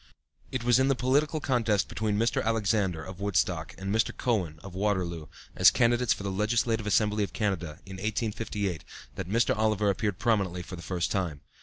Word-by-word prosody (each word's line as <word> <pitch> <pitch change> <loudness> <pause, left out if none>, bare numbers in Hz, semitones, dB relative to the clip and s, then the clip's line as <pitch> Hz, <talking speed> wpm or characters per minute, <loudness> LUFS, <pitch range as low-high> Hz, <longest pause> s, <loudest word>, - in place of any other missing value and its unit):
It - - -2
was 120 +1 +4
in 130 - +3
the 135 - +3
political 145 +5 +1
contest 115 -8 +1
between 105 -1 -1
Mr. 115 +2 +1
Alexander, 105 -6 0
of 95 -1 -9
Woodstock, 90 -4 0
and 95 +1 -3
Mr. 110 +1 +2
Cowan, 95 -11 0
of 100 -2 -9
Waterloo, 90 -5 -1 0.3
as - - +8
candidates 120 0 +2
for - - 0
the 100 - -2
Legislative 110 +2 0
Assembly 105 0 +2
of 100 - -5
Canada, 90 -7 -2
in 95 -1 -8
1858, 105 -3 -2 0.3
that 95 -3 -6
Mr. 115 +4 +2
Oliver 105 -2 +2
appeared 100 -1 -2
prominently 100 -6 0
for 90 - -8
the 85 - -9
first 85 -1 -2
time. 85 -7 -2
105 Hz, 180 wpm, -28 LUFS, 95-115 Hz, 0.3 s, as